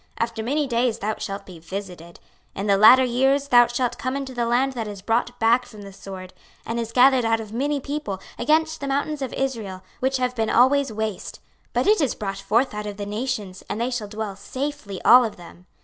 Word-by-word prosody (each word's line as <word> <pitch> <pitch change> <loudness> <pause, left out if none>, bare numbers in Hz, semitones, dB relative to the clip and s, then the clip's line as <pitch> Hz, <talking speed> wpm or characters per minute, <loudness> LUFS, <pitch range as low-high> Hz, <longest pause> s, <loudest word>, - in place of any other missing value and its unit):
26:038:008 - - +1
After 230 -1 -4
many 290 +6 0
days 240 -2 0
thou 215 +1 -2
shalt 195 0 -5
be 180 -3 -12
visited: 175 -1 -8 0.4
in 195 - -3
the 200 -1 +4
latter 235 +6 +8
years 270 +3 +1
thou 240 -1 +7
shalt 240 0 -2
come 255 +2 -2
into 275 -2 -4
the 240 -1 -1
land 255 +3 +1
that 230 -4 -4
is 205 -1 -7
brought 240 +2 -1
back 235 +2 +4
from 210 -4 -12
the 195 -1 -10
sword, 190 -1 -9 0.3
and 230 +1 -3
is 230 -1 -4
gathered 255 +1 +5
out 225 0 +1
of 220 -1 -8
many 285 +4 0
people, 275 -9 -4 0.2
against 315 +5 +1
the 280 - -3
mountains 285 +2 -1
of 265 - -3
Israel, 220 -9 -3 0.2
which 265 +1 +1
have 250 -1 -1
been 225 -2 0
always 265 +2 +4
waste: 220 -2 -4 0.3
but - - 0
it 420 -3 +4
is 275 -6 0
brought 195 -2 -4
forth 230 +6 +1
out 210 0 -5
of 205 -1 -6
the 205 - -4
nations, 210 -3 -4
and 215 - -3
they 240 +2 -1
shall 235 -4 -3
dwell 210 -1 -5
safely 255 -1 -5
all 250 +1 +8
of 220 -3 -3
them. 175 +1 -15
235 Hz, 225 wpm, -23 LUFS, 205-260 Hz, 0.4 s, latter